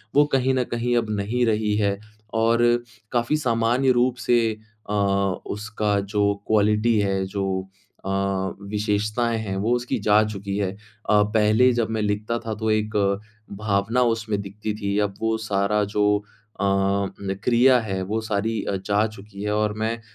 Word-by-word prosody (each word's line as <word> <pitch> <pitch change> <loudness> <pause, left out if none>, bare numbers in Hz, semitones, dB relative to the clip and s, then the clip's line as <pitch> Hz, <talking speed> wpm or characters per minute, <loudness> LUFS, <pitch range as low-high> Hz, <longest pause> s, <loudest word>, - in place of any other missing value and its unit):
वो 145 - +6
कहीं 130 0 +3
न 130 - +1
कहीं 120 +1 0
अब 115 -2 0
नहीं 120 +5 0
रही 105 -2 +1
है 100 -2 +1 0.4
और 115 +1 +3 0.5
काफ़ी 120 +5 +1
सामान्य 120 0 +2
रूप 125 0 +2
से 120 -1 +5 0.5
अ, 105 - -1
उसका 100 +1 0
जो 100 +1 +1
क्वालिटी 110 +1 +3
है, 95 -1 0
जो 95 -1 -3 0.4
अ, 95 - -3 0.6
विशेषताएँ 105 +3 0
हैं, 100 -3 -4
वो 110 +5 0
उसकी 120 0 -2
जा 105 +1 +6
चुकी 100 -2 -4
है। 100 -2 0 0.4
अ, 105 -1 +5
पहले 110 +4 +3
जब 115 -2 0
मैं 110 -1 -1
लिखता 105 +3 -1
था, 115 -2 -4
तो 110 +1 -1
एक 110 0 0 0.7
भावना 105 +4 +1 0.2
उसमें 110 -2 -3
दिखती 105 +2 -5
थी 100 0 -1
अब 100 - -14
वो 110 0 +1
सारा 100 +1 +1
जो 105 0 +2 0.4
अ, - - +1
न 100 0 0
क्रिया 125 +2 +5
है, 95 -4 -3
वो 105 +4 -2
सारी 110 +1 -1
अ, 100 - -1
जा 105 +1 +2
चुकी 105 -1 -10
है। 105 - -1
और 105 0 +1
मैं 115 +1 0
अ, - - -18
105 Hz, 165 wpm, -23 LUFS, 100-115 Hz, 0.7 s, वो